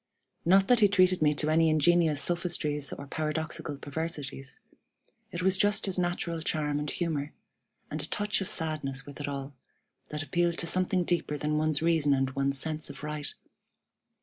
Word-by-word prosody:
Not 195 Hz, +3 st, +5 dB
that 245 Hz, -2 st, +5 dB
he 210 Hz, -, +6 dB
treated 185 Hz, -2 st, +3 dB
me 150 Hz, -1 st, +3 dB
to 155 Hz, +1 st, +1 dB
any 160 Hz, 0 st, +4 dB
ingenious 155 Hz, 0 st, +3 dB
sophistries 155 Hz, -3 st, +1 dB
or 140 Hz, -, -7 dB
paradoxical 155 Hz, 0 st, -3 dB
perversities. 145 Hz, -2 st, -5 dB, 0.7 s
It 175 Hz, +1 st, -4 dB
was 190 Hz, 0 st, +3 dB
just 205 Hz, 0 st, +3 dB
his 190 Hz, -2 st, +1 dB
natural 175 Hz, -2 st, -1 dB
charm 150 Hz, -2 st, -1 dB
and 150 Hz, 0 st, -3 dB
humor, 155 Hz, -4 st, -3 dB, 0.6 s
and 155 Hz, -, -3 dB
a 150 Hz, -, -2 dB
touch 205 Hz, +1 st, -1 dB
of 190 Hz, -, -3 dB
sadness 145 Hz, -5 st, -1 dB
with 145 Hz, +1 st, -9 dB
it 145 Hz, -, -3 dB
all, 140 Hz, 0 st, -5 dB, 0.6 s
that 150 Hz, 0 st, -4 dB
appealed 170 Hz, +4 st, 0 dB
to -, -, 0 dB
something 185 Hz, +1 st, +2 dB
deeper 170 Hz, -4 st, -1 dB
than 150 Hz, +1 st, -1 dB
one's 155 Hz, 0 st, +1 dB
reason 160 Hz, -4 st, +3 dB
and 135 Hz, -1 st, 0 dB
one's 140 Hz, +1 st, 0 dB
sense 155 Hz, +1 st, -1 dB
of -, -, -10 dB
right. 150 Hz, -1 st, -4 dB
155 Hz, 175 wpm, -29 LUFS, 145-175 Hz, 0.7 s, he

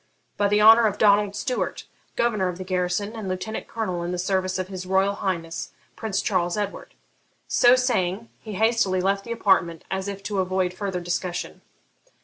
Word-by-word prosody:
'By 205 Hz, -, +2 dB
the 210 Hz, +1 st, +3 dB
honour 225 Hz, +1 st, +8 dB
of 205 Hz, -1 st, -2 dB
Donald 205 Hz, -1 st, +4 dB
Stewart, 250 Hz, +3 st, -2 dB, 0.3 s
governor 215 Hz, -6 st, +1 dB
of 180 Hz, -1 st, -4 dB
the 185 Hz, -, -5 dB
garrison, 185 Hz, +3 st, -1 dB
and 215 Hz, -4 st, -5 dB
lieutenant 185 Hz, +4 st, -4 dB
colonel 185 Hz, -6 st, -3 dB
in 170 Hz, +1 st, -3 dB
the 180 Hz, -, -2 dB
service 185 Hz, 0 st, 0 dB
of 185 Hz, -1 st, -3 dB
his 185 Hz, -1 st, -7 dB
Royal 190 Hz, +1 st, +2 dB
Highness 170 Hz, -5 st, -4 dB, 0.2 s
Prince 215 Hz, -4 st, -2 dB
Charles 180 Hz, -1 st, 0 dB
Edward.' 205 Hz, -1 st, -4 dB, 0.5 s
So 245 Hz, 0 st, +5 dB
saying, 230 Hz, -4 st, 0 dB
he 215 Hz, -, -8 dB
hastily 220 Hz, -2 st, +2 dB
left 195 Hz, +2 st, 0 dB
the 235 Hz, -, -7 dB
apartment, 185 Hz, -7 st, +1 dB
as 190 Hz, 0 st, -2 dB
if 200 Hz, 0 st, -6 dB
to 200 Hz, 0 st, -2 dB
avoid 185 Hz, -1 st, 0 dB
further 190 Hz, -2 st, -3 dB
discussion. 175 Hz, 0 st, -3 dB
195 Hz, 175 wpm, -24 LUFS, 185-210 Hz, 0.5 s, honour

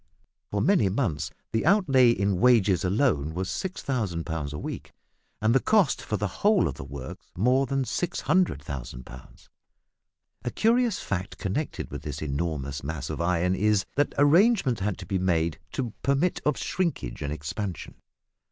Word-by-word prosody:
For 100 Hz, -, -1 dB
many 185 Hz, -, +4 dB
months 95 Hz, -, -1 dB, 0.2 s
the 110 Hz, -, 0 dB
outlay 145 Hz, -, +5 dB
in 100 Hz, -4 st, +1 dB
wages 100 Hz, -7 st, +4 dB
alone 90 Hz, -, +1 dB
was 95 Hz, +1 st, -2 dB
6000 125 Hz, -, -2 dB
pounds 80 Hz, -4 st, -3 dB
a 75 Hz, -, -5 dB
week, -, -, -6 dB, 0.5 s
and 110 Hz, +1 st, +2 dB
the 135 Hz, -, +5 dB
cost 200 Hz, -6 st, +3 dB
for 105 Hz, -, -2 dB
the 105 Hz, -2 st, -4 dB
whole 205 Hz, -2 st, +4 dB
of -, -, -3 dB
the -, -, -8 dB
works 70 Hz, -1 st, -8 dB
more 130 Hz, +7 st, +3 dB
than 135 Hz, 0 st, 0 dB
600,000 75 Hz, -, -1 dB
pounds. 65 Hz, 0 st, -14 dB, 1.0 s
A 120 Hz, -, -1 dB
curious 230 Hz, -, +2 dB
fact 95 Hz, -1 st, -4 dB
connected 100 Hz, +11 st, -3 dB
with -, -, -5 dB
this 75 Hz, -1 st, -5 dB
enormous 70 Hz, -2 st, -3 dB
mass 70 Hz, -2 st, -4 dB
of -, -, -4 dB
iron 90 Hz, +1 st, +1 dB
is, 105 Hz, +1 st, +2 dB
that 145 Hz, +1 st, +1 dB
arrangements 145 Hz, -, +4 dB
had 100 Hz, 0 st, -1 dB
to 95 Hz, -, -8 dB
be 95 Hz, +2 st, -1 dB
made 85 Hz, -3 st, 0 dB
to 120 Hz, -5 st, -3 dB
permit 140 Hz, +6 st, +1 dB
of 150 Hz, -5 st, +2 dB
shrinkage 110 Hz, -, -2 dB
and 70 Hz, -, -3 dB
expansion. 80 Hz, +4 st, -5 dB
100 Hz, 160 wpm, -26 LUFS, -, 1.0 s, outlay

